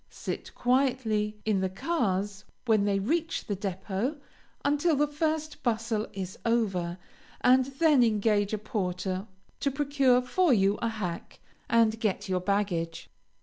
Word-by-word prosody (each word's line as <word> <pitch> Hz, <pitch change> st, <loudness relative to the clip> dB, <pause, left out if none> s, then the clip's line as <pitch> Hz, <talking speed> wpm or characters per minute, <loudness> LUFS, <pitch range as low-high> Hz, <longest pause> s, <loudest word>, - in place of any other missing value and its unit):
Sit -, -, -6 dB
quietly 245 Hz, -5 st, +1 dB
in 210 Hz, -3 st, +1 dB
the 190 Hz, -, 0 dB
cars 200 Hz, -, -1 dB, 0.2 s
when 215 Hz, -4 st, +3 dB
they 200 Hz, -1 st, +2 dB
reach 320 Hz, -, -1 dB
the 205 Hz, -, -2 dB
depot 195 Hz, -, -3 dB, 0.5 s
until 295 Hz, +3 st, +2 dB
the 295 Hz, +1 st, +3 dB
first 310 Hz, +1 st, -2 dB
bustle 225 Hz, -2 st, -1 dB
is 190 Hz, -1 st, -6 dB
over, 195 Hz, -7 st, 0 dB, 0.4 s
and 255 Hz, +1 st, +5 dB
then 275 Hz, +1 st, +3 dB
engage 210 Hz, -2 st, +2 dB
a 215 Hz, -, 0 dB
porter 190 Hz, -2 st, -3 dB, 0.3 s
to 280 Hz, -, +1 dB
procure 275 Hz, -2 st, +2 dB
for 350 Hz, +6 st, +2 dB
you 200 Hz, -3 st, +3 dB
a 230 Hz, -, +1 dB
hack, 195 Hz, -7 st, -5 dB, 0.3 s
and 225 Hz, -1 st, +3 dB
get 205 Hz, -2 st, -1 dB
your 185 Hz, -1 st, 0 dB
baggage. 185 Hz, -4 st, -1 dB
220 Hz, 140 wpm, -28 LUFS, 195-265 Hz, 0.5 s, and